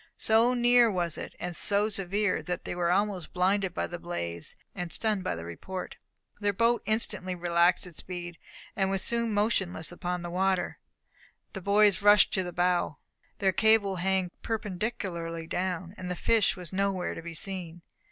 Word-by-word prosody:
So 230 +3 +4
near 240 -1 +5
was 175 -5 -1
it, - - -7
and 175 -1 -4
so 205 +5 +1
severe, 200 -1 0
that 180 -1 -4
they - - -3
were 175 -1 0
almost 195 -1 0
blinded 190 0 +1
by - - 0
the 175 - -6
blaze, 85 - -5 0.2
and 175 -1 -5
stunned 215 -4 0
by - - -1
the 85 0 -7
report. 180 - -6 0.4
Their 205 -1 +1
boat 230 +4 +2
instantly 210 -4 +1
relaxed 175 +1 +3
its 175 -3 -5
speed, 175 -2 -7 0.4
and 195 -1 +1
was 195 -1 +1
soon 235 -1 +1
motionless 200 -6 0
upon 180 0 -3
the 175 - -5
water. 190 0 0 0.7
The 195 - -6
boys 205 +1 +4
rushed 205 +1 +6
to 190 - +2
the 180 -1 -4
bow. 175 -4 +1 0.4
Their 190 -1 +2
cable 215 -2 +3
hung 185 0 0
perpendicularly 185 -6 -3
down, 180 +1 -3
and 180 -1 -5
the 180 - -2
fish 220 +3 +2
was 180 -2 -8
nowhere 195 -1 0
to - - -7
be 170 0 -8
seen. 175 -2 -5
185 Hz, 170 wpm, -29 LUFS, 175-205 Hz, 0.7 s, rushed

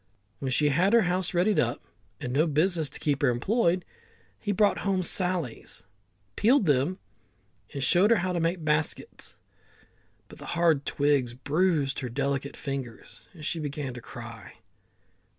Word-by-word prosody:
When 135 - -3
she 145 +3 +2
had 180 +9 +2
her 235 -2 +6
house 180 0 0
readied 190 +3 +2
up, - - 0 0.4
and 125 - -4
no 155 +5 +3
business 160 0 +1
to - - -7
keep 145 -3 0
her - - +4
employed, 180 - +1 0.5
he 205 - -2
brought 205 +1 +2
home 190 -2 0
sallies 175 - 0
[willows], 95 -1 -41
peeled 240 0 +4
them, 145 +5 +2 0.7
and 140 - -4
showed 180 +10 +5
her 230 - +5
how 185 +1 -1
to 175 - 0
make 165 0 -1
baskets. 150 0 -1 0.9
But - - -14
the - - -9
hard 165 -4 +2
twigs 140 -4 +1
bruised 150 0 +1
her 125 - -4
delicate 140 +2 -2
fingers, 135 -5 -6
and 155 -2 -9
she 165 - -2
began 145 -3 -4
to 125 - -8
cry. 115 -3 -10
150 Hz, 160 wpm, -27 LUFS, 135-180 Hz, 0.9 s, her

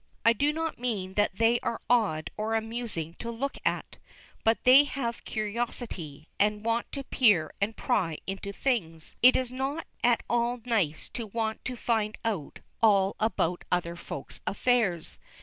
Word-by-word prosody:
I 230 - +7
do 285 +6 +2
not 320 -2 -3
mean 205 -7 -2
that 205 -1 +1
they 230 +3 +3
are 230 - -2
odd 215 -10 +2
or 220 +1 -1
amusing 225 -8 -3
to 235 - -5
look 255 +4 -3
at. - - -1 0.5
But 225 +1 +2
they 260 +3 +9
have 240 -5 -3
curiosity, 210 - -4
and 210 +1 +1
want 230 +1 0
to 275 - -3
peer 205 -13 +3
and 215 +3 0
pry 165 -6 0
into 195 +1 -4
things. 180 - -1
It 255 +1 +8
is 255 -1 0
not 270 +5 -3 0.2
at 240 -1 +3
all 240 +1 +1
nice 190 -11 0
to 230 -3 -5
want 220 +1 -2
to 255 - -3
find 220 -3 0
out 195 -11 -3 0.2
all 200 -3 +4
about 180 -5 0
other 170 -1 0
Folks' 140 -5 -7
affairs. 205 -7 +1
225 Hz, 160 wpm, -28 LUFS, 190-240 Hz, 0.5 s, they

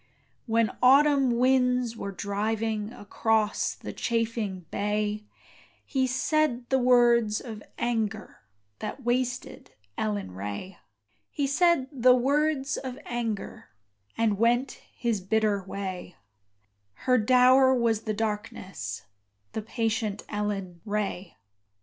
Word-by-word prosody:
When 225 -1 +2
autumn 270 -1 +5
winds 250 -2 +2
were 200 -3 -5
driving 210 +2 -2
Across 220 0 0
the - - -8
chafing 225 -6 -2
bay, 210 +1 -1 0.6
He 260 -2 0
said 260 -1 0
the 265 - +4
words 240 -3 +4
of 220 -4 -8 0.2
anger 220 -2 -2 0.4
That 270 - -6
wasted 245 +1 -2 0.3
Ellen 100 -3 -2
Ray: 100 - -6 0.5
He 285 - -1
said 305 -1 +3
the 255 -2 +5
words 280 +2 +1
of 260 -1 -6
anger 230 -4 -4 0.5
And 215 -3 +1
went 240 +3 +1
his 230 -5 -1
bitter 210 +1 +1
way: 185 -2 -6 0.9
Her 255 -1 +4
dower 255 +3 +5
was 230 -3 +1
the 215 -1 -2
darkness 195 - -4 0.5
The 220 - -3
patient 220 -2 -2
Ellen 195 -4 -3
Ray. 205 -4 -3
225 Hz, 105 wpm, -27 LUFS, 205-250 Hz, 0.9 s, autumn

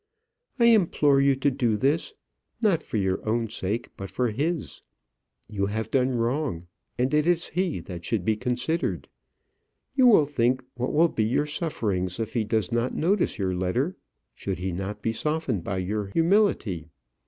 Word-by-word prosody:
I 235 - +4
implore 165 -11 +4
you 140 0 +4
to 135 +2 +1
do 120 -5 +1
this, 145 - 0 0.4
not 200 -8 +2
for 115 - -4
your 95 -2 0
own 115 +1 +1
sake, 110 +4 -3
but 95 -1 -6
for 125 -3 0
his. 155 +7 -2 0.7
You 100 -2 -1
have 110 +2 -3
done 130 -1 +2
wrong, 120 - -1 0.3
and 125 +3 0
it 150 +1 +3
is 175 -1 +1
he 180 - -1
that 85 0 -8
should 100 0 -1
be 110 - +2
considered. 125 +8 -2 0.8
You 260 -2 +5
will 205 -11 +6
think 130 -2 +1
what 125 +1 -2
will 165 +3 +5
be 110 - 0
your 125 +6 +1
sufferings 110 - -2
if 110 -1 -3
he 115 - +1
does 110 -3 0
not 120 +2 0
notice 190 +4 +1
your 95 -2 -1
letter; 105 - -1 0.4
should 95 -2 -4
he 95 +2 -3
not 95 +4 -5
be 115 - 0
softened 150 - -1
by 95 +1 -3
your 100 +3 -2
humility. 165 - +1
125 Hz, 170 wpm, -26 LUFS, 105-155 Hz, 0.8 s, will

